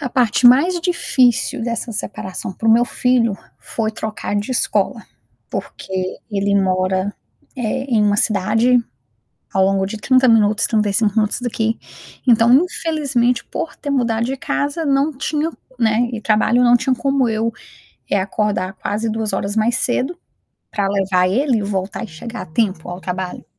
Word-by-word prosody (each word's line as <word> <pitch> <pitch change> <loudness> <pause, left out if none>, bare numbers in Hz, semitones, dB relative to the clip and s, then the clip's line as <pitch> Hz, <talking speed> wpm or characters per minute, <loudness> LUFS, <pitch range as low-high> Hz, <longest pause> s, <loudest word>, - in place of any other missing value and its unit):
A 265 - -3
parte 245 -1 +3
mais 335 +8 +5
difícil 260 -10 +1
dessa 235 0 -3
separação 190 -2 -5
para 225 +4 -2
o - - +7
meu 240 +1 +5
filho 240 -5 +1 0.2
foi 220 -1 -3
trocar 215 -1 -4
de 205 +5 -2
escola, 255 - 0 0.5
porque 185 -1 -4
ele 200 0 0
mora, 185 +1 0 0.4
eh, 255 +2 -2
em 230 -6 +1
uma 205 0 +2
cidade, 225 +4 +2 0.7
ao 190 - +3
longo 195 0 +1
de 210 +3 -5
30 255 +4 +3
minutos, 215 -2 +4
35 210 -1 +1
minutos 215 +1 +1
daqui, 225 -2 -1 0.5
então 235 0 +5
infelizmente 275 -6 +1
por 325 -2 -5
ter 285 - -6
mudado 235 -4 +1
de 265 - -2
casa 290 +5 -2
não 280 +2 +2
tinha, 305 +3 -1 0.3
né, 230 +1 +2
e 230 - -4
trabalho 220 +3 +2
não 240 0 +6
tinha 260 - 0
como 270 0 +1
eu, 225 +1 -1 0.6
eh, 200 - +2
acordar 200 -1 -1
quase 220 +2 -2
2 220 -2 -2
horas 200 +2 -2
mais 225 +3 +2
cedo, 265 +8 -1 0.5
para 200 -2 -1
levar 190 -2 +1
ele 250 +4 +1
e - - -2
voltar 200 +2 -3
e - - -8
chegar 230 +9 -7
a - - -9
tempo 180 0 -1
ao 175 +1 -6
trabalho. 185 0 -5
225 Hz, 160 wpm, -19 LUFS, 200-250 Hz, 0.7 s, o